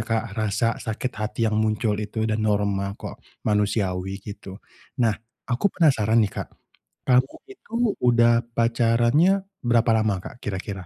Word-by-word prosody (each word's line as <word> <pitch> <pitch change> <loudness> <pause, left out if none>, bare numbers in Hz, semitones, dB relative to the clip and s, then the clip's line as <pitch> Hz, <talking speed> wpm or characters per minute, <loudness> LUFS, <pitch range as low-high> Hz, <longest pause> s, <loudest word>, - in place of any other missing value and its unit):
Kak 115 -1 -1
rasa 110 +2 0
sakit 125 +2 -3
hati 105 0 -4
yang 110 -1 +1
muncul 110 0 +1
itu 110 +1 -3
dan 110 0 0
normal 100 -2 0
kok, - - -9 0.2
manusiawi 100 -3 0
gitu. 100 -2 -9 0.5
Nah 110 - +3 0.3
aku 135 +11 +1
penasaran 115 - +3
nih 100 - -4
Kak - - -4 0.6
kamu 125 +2 +3
itu 390 - -16 0.3
udah 120 -1 +4
pacarannya 120 +7 +3 0.4
berapa 120 0 +3
lama 110 -1 +1
Kak - - -9
kira-kira? 95 -1 -5
110 Hz, 140 wpm, -24 LUFS, 105-120 Hz, 0.6 s, udah